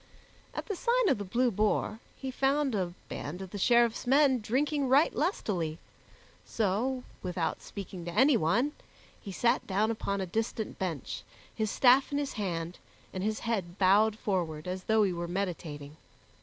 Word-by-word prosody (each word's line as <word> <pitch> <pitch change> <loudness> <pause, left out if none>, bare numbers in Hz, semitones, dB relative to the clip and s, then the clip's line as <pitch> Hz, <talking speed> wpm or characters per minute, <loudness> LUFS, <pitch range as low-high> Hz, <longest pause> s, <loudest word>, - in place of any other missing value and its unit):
At - - -4
the 410 - -3
Sign 480 +1 +2
of - - +2
the - - -3
Blue 240 +6 +1
Boar 215 +1 0 0.2
he 265 -1 -5
found 275 +1 +1
a 180 -4 -2
band 155 +6 -5
of 190 -2 -8
the 205 - -5
Sheriffs 235 +2 +3
men 270 -1 +5
drinking 275 +6 0
right 275 +5 +4
lustily; 185 - -1 0.7
so, 235 +5 -1 0.2
without 175 -3 -2
speaking 190 -3 -8
to 175 - -4
anyone, 235 - +3 0.5
he 200 - -7
sat 235 +6 +1
down 210 +3 +1
upon 200 -3 -2
a 190 - -1
distant 220 +3 -3
bench, 170 -8 -3 0.3
his 220 -1 -1
staff 260 +5 +5
in 285 - 0
his 285 -1 -2
hand, 175 -5 -3 0.3
and 185 - -3
his 215 +1 -1
head 195 -6 -2
bowed 210 +3 +4
forward 170 -7 -2
as 185 0 -4
though 220 -1 +4
he 190 -3 +1
were 170 0 -4
meditating. 165 -5 -4
210 Hz, 165 wpm, -30 LUFS, 180-255 Hz, 0.7 s, men